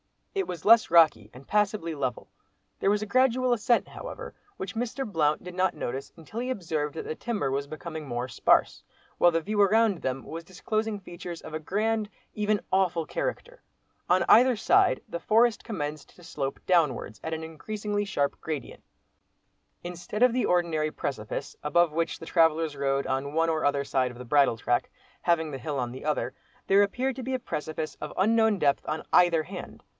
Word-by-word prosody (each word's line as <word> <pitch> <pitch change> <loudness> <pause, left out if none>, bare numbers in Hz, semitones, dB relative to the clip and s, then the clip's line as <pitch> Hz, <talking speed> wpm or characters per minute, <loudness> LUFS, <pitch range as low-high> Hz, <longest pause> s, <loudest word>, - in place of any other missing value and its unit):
It 390 -1 -1
was 170 -3 -6
less 230 +1 +6
rocky, 155 -11 +5
and 130 +2 -13
passably 205 -4 0
level. 130 -5 -3 0.5
There - - +2
was 205 +1 +2
a - - -2
gradual 255 +2 +3
ascent 235 +1 +1
however, - - -8 0.2
which 190 +2 -6
Mr. 245 +4 -2
Blount 155 -7 +1
did 180 0 -8
not 185 +1 +1
notice 135 +3 -5
until 170 +7 -8
he 250 +1 -3
observed 160 - -2
that - - -4
the - - -4
timber 210 - -2
was 140 +1 -2
becoming 155 0 -7
more 120 0 -3
sparse, 115 - +2 0.4
while 175 - +7
the 165 -1 0
view 205 +4 0
around 210 -1 +3
them 130 0 -2
was 165 +1 -7
disclosing 215 +3 -2
features 175 -2 -8
of 155 - -10
a 155 - -2
grand, 215 +5 -1 0.2
even 210 -1 0
awful 180 -4 +2
character. - - -4 0.5
On - - +4
either 250 +1 +7
side 375 - +3
the 170 - -5
forest 225 +5 +3
commenced 150 -8 -5
to 175 - -17
slope 140 -4 -4
downwards, 150 - +1
at 160 - -3
an 160 0 -4
increasingly 205 +6 -3
sharp 145 -8 -1
gradient. 155 -3 -6 1.0
Instead 180 +6 -3
of 250 -2 +5
the 250 - +1
ordinary 165 -3 +1
precipice, 110 -9 -5
above 165 +3 +3
which 165 +2 -1
the - - -8
travellers 160 -2 +2
rode, 140 0 0
on 135 +2 -2
one 165 +1 +2
or 160 -2 0
other 140 -1 +2
side 130 -2 0
of 120 - -12
the 125 - -8
bridle 140 -2 +3
track, 120 +1 0 0.3
having 160 -3 +1
the 135 - -5
hill 145 +2 -3
on 120 -2 -2
the 130 +3 -9
other, 150 -4 -1 0.3
there 195 +1 +5
appeared 250 +6 0
to - - -4
be 260 +2 -3
a - - +2
precipice 155 -6 -4
of 150 - -7
unknown 220 +1 +3
depth 140 -5 +2
on 155 - -2
either 170 -3 +5
hand. - - -9
170 Hz, 190 wpm, -27 LUFS, 150-210 Hz, 1.0 s, while